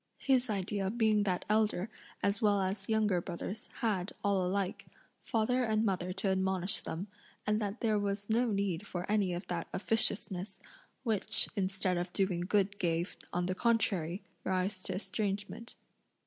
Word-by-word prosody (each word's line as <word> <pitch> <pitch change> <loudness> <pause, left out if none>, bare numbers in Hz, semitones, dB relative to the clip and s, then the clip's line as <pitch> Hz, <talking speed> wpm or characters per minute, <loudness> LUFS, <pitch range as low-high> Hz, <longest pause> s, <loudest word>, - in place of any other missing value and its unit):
His 255 -3 +2
idea 200 -1 -1
being 220 -1 +3
that 185 -2 0
elder 215 -2 +2 0.4
as 200 0 +1
well 205 -2 +4
as 195 +2 -2
younger 215 -5 +2
brothers 190 +4 -6
had, 205 -4 0
all 200 -2 +2
alike, 190 +1 -1 0.3
father 250 +3 +1
and 220 -1 +2
mother 185 -3 0
to 195 +1 -1
admonish 190 0 +2
them, 170 +4 -4 0.4
and 210 +1 +1
that 205 +2 -3
there 215 -3 +2
was 200 0 -2
no 235 +3 +2
need 200 -2 -1
for 180 0 -4
any 205 -3 +2
of 175 +2 -4
that 170 -2 -3
officiousness, 200 -2 +1 0.4
which, 220 -5 +3
instead 190 -2 0
of 175 +1 -3
doing 190 -3 +1
good 200 +2 +1
gave, 170 0 0 0.2
on 175 0 0
the 185 - 0
contrary, 190 -5 +1 0.2
rise 185 +1 -1
to - - -3
estrangement. 205 +3 -3
200 Hz, 155 wpm, -33 LUFS, 185-215 Hz, 0.4 s, well